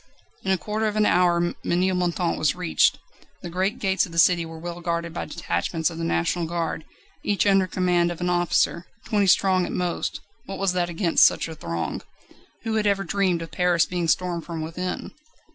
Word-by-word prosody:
In 190 - -3
a 190 - +3
quarter 215 +3 -2
of 210 - -2
an 215 0 +3
hour 175 -1 +3
Ménilmontant 180 -1 0
was 155 - +1
reached. 180 -2 +2 0.5
The 175 - -6
great 190 +4 -1
gates 190 -2 +1
of - - -14
the 165 - -8
city 170 0 +4
were 165 0 -9
well 175 +1 -7
guarded 170 -1 -2
by - - -4
detachments 165 -1 -2
of 165 - -8
the - - -3
National 170 0 0
Guard, 165 -2 -3 0.4
each 205 0 +1
under 195 -2 +4
command 175 -1 +1
of 170 - -7
an 180 - -1
officer. 175 0 +1 0.2
Twenty 205 -2 +1
strong 185 0 +4
at - - -5
most 180 -1 -2 0.3
what 195 - -5
was 195 -2 +1
that 175 -1 0
against 170 0 +3
such - - +4
a 165 - -7
throng? 85 - -4 0.6
Who 220 -1 -1
had 210 -1 +1
ever 200 -1 +1
dreamed 180 -1 0
of 165 - -10
Paris 180 -2 +2
being 175 -2 -2
stormed 175 0 0
from 165 -1 -5
within? 180 +3 -4
175 Hz, 195 wpm, -24 LUFS, 170-185 Hz, 0.6 s, city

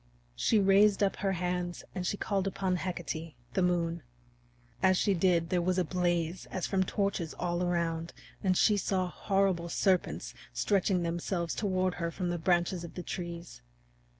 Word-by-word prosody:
She 220 - +2
raised 200 +1 +5
up 195 - +1
her 195 0 0
hands 180 0 -2
and 180 -2 -3
she 205 - -1
called 195 -2 -1
upon 190 -1 0
Hecate, 165 -4 -4 0.2
the 190 - +1
Moon. 170 -2 +1 0.8
As 185 -1 +4
she 200 - +2
did, 170 -2 +2
there 180 -1 +2
was 180 +1 +1
a 185 - +3
blaze 175 0 -1
as 185 - -2
from 190 -1 +1
torches 190 -4 -1
all 175 0 -1
around, 170 -2 -1 0.3
and 185 -2 +2
she 210 -2 +4
saw 190 -2 0
horrible 195 -4 +1
serpents 180 - 0 0.2
stretching 185 - +1
themselves 170 0 -2
toward 185 -3 0
her 170 - 0
from 180 +1 -3
the 175 - -2
branches 175 +1 +1
of 170 - -9
the 180 - -5
trees. 170 -1 -6
180 Hz, 165 wpm, -31 LUFS, 170-190 Hz, 0.8 s, raised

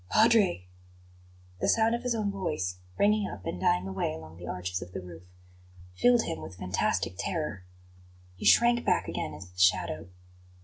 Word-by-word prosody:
"Padre!" 215 - +4 0.9
The - - +1
sound 225 0 +3
of 235 - -1
his 250 -2 -1
own 210 -2 -1
voice, 95 - -3 0.2
ringing 210 0 +3
up 95 - -9
and 90 - -4
dying 90 +1 +2
away 95 -4 -2
along 80 0 -11
the 90 0 -9
arches 90 0 -3
of 90 0 -9
the - - -4
roof, 90 -1 -11 0.7
filled 240 - +4
him 165 - -4
with 95 - -9
fantastic 90 0 -1
terror. 150 - -3 0.7
He 90 - -7
shrank 240 0 +5
back - - +1
again - - -4
into 90 -1 -11
the 90 - -12
shadow. 90 -3 +2
95 Hz, 170 wpm, -29 LUFS, -, 0.9 s, shrank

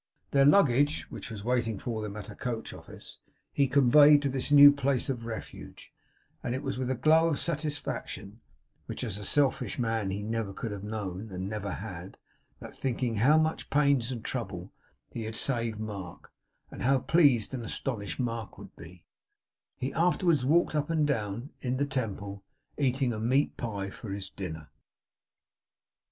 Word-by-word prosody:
Their 140 -1 +5
luggage, 145 -3 +4
which 110 0 -7
was 105 -3 -7
waiting 115 -2 0
for 115 0 -4
them 105 -1 -5
at 105 - -7
a 105 - -8
coach 115 +2 -4
office, - - -10 0.3
he 140 -1 +3
conveyed 145 +2 +6
to 140 - +1
this 135 +2 -2
new 145 0 +10
place 140 -2 0
of 115 -3 -5
refuge; 110 -1 -8 0.5
and 125 - -2
it 130 - -4
was 135 -2 -3
with 130 -1 -2
a 130 - +1
glow 160 +5 +4
of 155 -4 0
satisfaction, 145 - -4 0.5
which - - -5
as 105 -4 -4
a - - -7
selfish 140 +6 +1
man 115 -4 -1
he 100 +2 -3
never 110 -2 -2
could 115 - -5
have 100 -1 -6
known 105 -1 -5
and 95 +1 -4
never 100 -1 -4
had, 95 -3 -8 0.4
that, - - -10
thinking 120 -3 -1
how 140 +9 +5
much 160 0 0
pains 140 -4 +2
and 120 -3 -6
trouble - - -5 0.4
he 115 - -5
had 110 0 -5
saved 115 -5 -1
Mark, 100 -5 -7 0.4
and - - -9
how 135 +2 +4
pleased 135 -4 +3
and 125 -3 -4
astonished 110 -2 -3
Mark 115 -3 -3
would - - -12
be, 85 +1 -13 0.7
he 130 +1 -3
afterwards 170 -3 +2
walked 160 +6 +3
up 150 0 -1
and 160 -2 +2
down, 115 -1 -2
in 125 0 -1
the 145 - +1
Temple, 100 -7 -4 0.3
eating 130 -3 +1
a 110 - -4
meat 130 +6 +1
pie 100 -4 -4
for 110 - -9
his 95 -1 -5
dinner. 80 -6 -7
120 Hz, 170 wpm, -29 LUFS, 105-140 Hz, 0.7 s, new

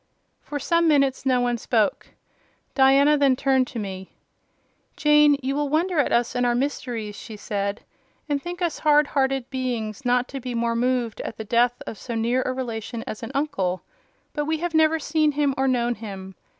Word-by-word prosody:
For 295 - -5
some 335 +4 +2
minutes 275 -3 +2
no 255 -1 +3
one 245 -1 0
spoke. 220 -3 0 0.7
Diana 275 +2 +5
then 275 -2 +4
turned 265 -1 +2
to 245 - -8
me. 190 -3 -6 0.8
"Jane, 300 -1 +5
you 270 +1 -1
will 290 -1 -1
wonder 330 +3 +1
at 285 - +2
us 240 +1 +1
and 245 0 0
our 240 -1 +2
mysteries," 240 -5 -3
she 220 -1 -9
said, 200 -1 -3 0.4
"and 290 -2 -1
think 350 +2 -5
us 340 - -1
hard 300 -1 +4
hearted 270 -2 0
beings 250 -3 -3
not 250 0 +2
to 270 - -5
be 250 -1 -5
more 230 0 0
moved 245 -2 0
at - - -6
the 220 - -5
death 240 +2 +1
of 215 - -7
so 235 - -5
near 235 +3 +1
a - - 0
relation 235 -3 -5
as 215 - -6
an 230 - -6
uncle; 190 - -1 0.5
but 295 -1 -2
we 315 +1 0
have 345 +1 -3
never 315 0 +4
seen 310 0 +1
him 285 -1 +1
or 270 -1 +1
known 245 -2 +1
him. 195 -4 -8
255 Hz, 190 wpm, -24 LUFS, 235-290 Hz, 0.8 s, Diana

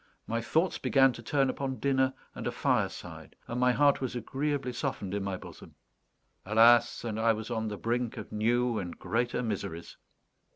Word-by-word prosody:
My 115 +1 -2
thoughts 160 +10 +1
began 135 -2 +4
to 120 - -9
turn 135 +3 +1
upon 130 0 -3
dinner 130 -1 +1 0.2
and - - -5
a - - 0
fireside, - - -2
and 120 - -3
my 125 0 +4
heart 145 +2 +3
was 130 -2 -3
agreeably 135 +2 -2
softened 100 -4 -3
in 100 -1 -1
my 95 -1 -3
bosom. - - -12 0.7
Alas, 115 +4 +5
and 110 -2 -3
I 115 0 +4
was 110 +2 -6
on 110 -1 -1
the 105 -1 -4
brink 120 +1 -2
of - - -7
new 120 +2 +1
and 90 -3 -6
greater 120 +2 -1
miseries! 85 -7 -5
120 Hz, 175 wpm, -30 LUFS, 110-130 Hz, 0.7 s, Alas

